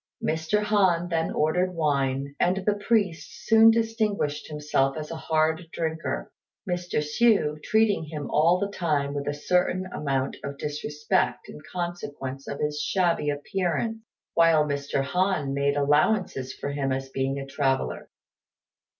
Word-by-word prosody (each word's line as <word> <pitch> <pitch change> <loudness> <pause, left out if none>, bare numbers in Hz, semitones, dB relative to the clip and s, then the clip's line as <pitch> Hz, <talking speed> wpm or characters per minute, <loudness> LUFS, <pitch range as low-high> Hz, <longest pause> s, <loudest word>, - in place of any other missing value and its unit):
Mr. 160 +7 0
Han 190 -5 +2
then 165 -1 0
ordered 180 +4 +1
wine, 140 -3 0
and 185 +2 +1
the 210 - +3
priest 205 -2 -1
soon 225 0 +7
distinguished 220 -9 0
himself 150 -2 0
as 155 0 -6
a - - -4
hard 160 +1 0
drinker; 160 - -3 0.4
Mr. 175 0 -2
Hsü 150 0 +2
treating 215 -3 +2
him 150 -2 -6
all 165 +4 +4
the 200 +2 -2
time 145 -5 0
with 140 0 -4
a 145 - 0
certain 180 +4 +1
amount 135 -2 -1
of 140 0 -5
disrespect 150 0 -1
in - - -9
consequence 145 -7 -5
of 140 - -5
his 150 0 -1
shabby 170 -5 +1
appearance, 185 +8 -1 0.3
while 165 -2 +5
Mr. 140 -1 -1
Han 180 -2 0
made 140 +1 +1
allowances 145 -1 +2
for 140 - -5
him 140 -1 -1
as 135 0 -3
being 135 +1 -1
a 135 - -4
traveller. 135 - -1
155 Hz, 140 wpm, -26 LUFS, 140-185 Hz, 0.4 s, soon